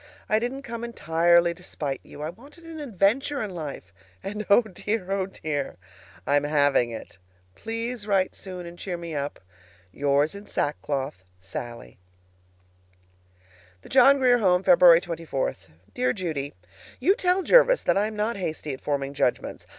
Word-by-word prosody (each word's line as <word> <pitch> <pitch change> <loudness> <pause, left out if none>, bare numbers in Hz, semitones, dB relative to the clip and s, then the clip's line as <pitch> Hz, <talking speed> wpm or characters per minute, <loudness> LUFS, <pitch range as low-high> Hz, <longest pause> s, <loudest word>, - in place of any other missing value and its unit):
I 215 - +3
didn't 255 +4 -4
come 235 -2 -6
entirely 170 -5 +3
to 175 - -17
spite 145 -6 -4
you. 150 - -10
I 155 - -3
wanted 280 - -17
an 330 -1 -9
adventure 265 +3 +1
in 210 - -5
life, 145 - -7 0.3
and, 210 +2 -5
oh 200 +4 +6
dear! 205 -1 -4
oh 195 -1 0
dear! 145 - -4 0.5
I'm 145 0 +2
having 145 -4 +3
it! 110 -5 -9 0.3
PLEASE 230 - -5
write 195 -2 +2
soon, 185 -2 -8
and 170 0 -10
cheer 180 -3 -4
me 170 -1 -7
up. 145 -1 -4 0.5
Yours 145 - +1
in 200 +1 -10
sackcloth, 140 -6 -2 0.2
SALLIE. 95 - -8 1.8
THE - - -13
JOHN 270 +2 +6
GRIER 250 -2 +4
HOME, 185 -3 +3
February 175 -2 +7
24. 165 -6 -3 0.4
Dear 125 0 +1
Judy: 145 - -4 0.4
You 355 +10 +4
tell 370 -1 +1
Jervis - - +5
that - - +2
I 205 +2 +2
am 215 - -7
not 210 +1 -1
hasty 155 -5 -4
at 130 - -8
forming 140 -1 -2
judgments. 125 -3 -1
180 Hz, 155 wpm, -25 LUFS, 145-225 Hz, 1.8 s, February